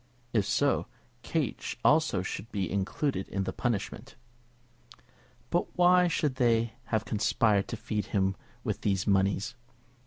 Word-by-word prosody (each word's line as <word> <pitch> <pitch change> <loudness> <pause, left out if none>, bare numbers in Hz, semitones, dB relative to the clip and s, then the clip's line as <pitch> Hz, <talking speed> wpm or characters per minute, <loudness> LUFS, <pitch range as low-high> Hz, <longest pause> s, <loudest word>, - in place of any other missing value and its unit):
If 105 -4 +2
so, - - +2 0.3
Kate - - -2
also - - +4
should 115 - -5
be 95 -3 -2
included 100 +3 -1
in 100 0 -1
the 95 - -3
punishment. 120 -6 -3 1.4
But 175 - -1
why 180 0 +6
should 150 -5 0
they 115 -2 +2
have 110 -1 -1
conspired 105 -1 +2
to 115 - -4
feed 105 -1 -3
him 95 -2 +1 0.3
with - - -2
these 95 -2 0
moneys? 100 +4 +1
110 Hz, 130 wpm, -29 LUFS, 100-120 Hz, 1.4 s, why